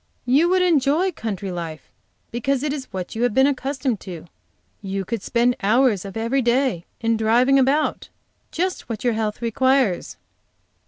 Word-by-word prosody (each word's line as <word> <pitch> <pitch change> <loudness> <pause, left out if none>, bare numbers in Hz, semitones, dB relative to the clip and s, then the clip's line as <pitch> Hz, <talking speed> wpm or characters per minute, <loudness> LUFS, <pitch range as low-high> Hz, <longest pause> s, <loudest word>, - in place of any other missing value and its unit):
You 285 +8 +3
would 370 0 +3
enjoy 325 +2 +2
country 200 - -5
life, 165 -3 -7 0.4
because 260 +3 -1
it 295 -2 -1
is 275 -3 -5
what 185 -1 -5
you 225 - -4
have 245 -3 +1
been 265 - +5
accustomed 270 -4 -1
to; 175 -4 -9 0.6
you 195 -1 -3
could 230 +1 -3
spend 240 +3 +1
hours 215 -1 +2
of 195 +2 -7
every 230 +5 0
day 240 -7 +1 0.2
in 230 0 +1
driving 240 +5 +4
about; 275 +4 +1 0.4
just 365 -3 -2
what 220 -2 -5
your 240 -2 +2
health 220 +1 -3
requires." 255 -3 +1
240 Hz, 160 wpm, -22 LUFS, 215-275 Hz, 0.6 s, been